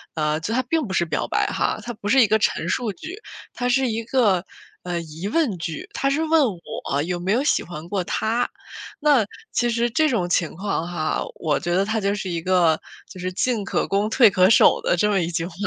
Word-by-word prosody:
呃， 150 -1 0
就 205 +7 -3
他 255 - +2
并 310 +4 0
不 190 - -5
是 170 - +2
表 - - -2
白 - - +1
哈。 - - -1
它 240 0 -6
不 205 -1 -6
是 265 +4 +6
一 225 - +5
个 220 +2 +3
陈 - - 0
述 240 -4 -1
句， 315 - -8 0.4
它 245 0 -2
是 260 +1 +2
一 225 0 -2
个， 215 -7 +2 0.4
呃， 175 -1 -2
疑 165 +3 -7
问 275 - +1
句， 165 -2 -5
他 275 - 0
是 295 +4 0
问 320 0 +4 0.4
我 140 +1 0
有 175 +2 -3
没 185 +3 -1
有 240 - +2
喜 - - +2
欢 170 -1 -8
过 190 -1 -1
他。 230 +6 -1 0.5
那 285 -7 +4 0.3
其 240 - +1
实 235 +1 +1
这 310 +6 +2
种 195 -9 0
情 170 -3 0
况 190 -3 -2
哈， 160 -3 -2
我 155 -3 0
觉 175 - -2
得 195 +2 +2
他 220 +1 -1
就 200 0 +1
是 195 -2 -4
一 170 -1 -2
个 170 -3 +3 0.3
就 185 - -11
是 185 +1 -3
进 230 +2 0
可 - - -1
攻 200 +2 0
退 230 0 +6
可 185 0 +4
守 - - +5
的 - - +1
这 210 +4 +2
么 200 -2 +2
一 165 - -1
句 165 0 -2
话， 175 - -8
200 Hz, 255 characters per minute, -22 LUFS, 175-240 Hz, 0.5 s, 是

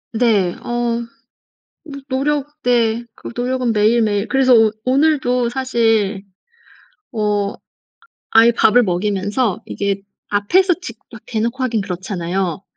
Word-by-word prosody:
네 215 -7 +2
어. 240 -1 -1 0.8
노 280 -3 -9
노력 295 +2 -2
네 235 -1 +1
그 - - -9
노력은 250 0 -1
매일매일 210 -1 +2
그래서 265 -1 +4
오 225 -2 +5
오늘도 255 -3 +2
사실 225 -6 0 0.9
어 210 -2 -1 0.8
아예 225 +1 +6
밥을 245 +1 +4
먹이면서 205 +3 -1
이게 200 -1 -2 0.3
앞에서 350 - +2
직 230 -10 -8 0.2
여 - - -7
대놓고 235 +3 -2
하긴 230 -4 0
그렇잖아요. 185 0 -3
230 Hz, 230 characters per minute, -18 LUFS, 205-255 Hz, 0.9 s, 아예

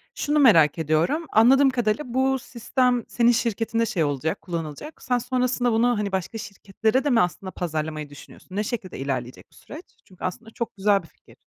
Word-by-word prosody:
şunu 295 +1 0
merak 165 - +6
ediyorum 160 - 0
anladığım 265 +5 +6
kadarıyla 240 +1 0
bu 265 0 +2
sistem 245 0 0
senin 240 0 +3
şirketinde 230 0 0
şey 170 -7 -1
olacak, 145 +2 -2
kullanılacak. 165 - -6
Sen 250 -1 +1
sonrasında 250 0 0
bunu, 225 +2 +3
hani, 205 -1 -2
başka 190 +4 -3
şirketlere 220 +4 -2
de 290 - 0
mi 235 -3 +4
aslında 185 +1 -2
pazarlamayı 155 -3 -4
düşünüyorsun? 145 +5 -13
Ne 210 - 0
şekilde 205 - -5
ilerleyecek 130 -2 -4
bu - - -23
süreç? 315 +6 -11 0.2
Çünkü 185 - -16
aslında 225 +5 -5
çok 235 - -5
güzel 200 -2 +2
bir - - -15
fikir. - - -22
220 Hz, 175 wpm, -24 LUFS, 170-245 Hz, 0.2 s, merak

